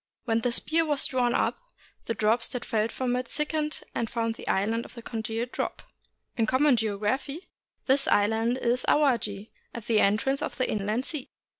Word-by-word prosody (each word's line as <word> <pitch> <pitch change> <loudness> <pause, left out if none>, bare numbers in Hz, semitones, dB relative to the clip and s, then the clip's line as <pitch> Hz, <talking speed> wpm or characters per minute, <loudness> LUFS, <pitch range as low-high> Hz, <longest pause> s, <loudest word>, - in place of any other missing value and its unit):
When 225 -2 +2
the 245 - 0
spear 320 +7 +3
was 295 -3 +1
drawn 245 -2 +1
up, - - +1 0.5
the 230 - -2
drops 225 +2 +2
that 250 - -5
fell 220 -1 +1
from 245 +1 -1
it 250 -1 -2
thick 300 +4 -2
ened 305 -1 -2
and 230 - -1
formed 230 -1 -1
the - - -11
Island 220 +4 +1
of - - -13
the 235 - -9
Congealed 225 +2 -3
Drop. - - -3 0.5
In 225 -3 +1
common 270 +2 +4
geography, 225 - -2 0.4
this 275 +1 +3
island 225 +4 +2
is 245 0 0
Awaji, 225 -8 +1 0.2
at 235 -3 -6
the 225 -2 +3
entrance 215 +8 +2
of - - -4
the 255 - +1
Inland 215 +5 -1
Sea. 300 -5 -6
235 Hz, 185 wpm, -27 LUFS, 220-260 Hz, 0.5 s, common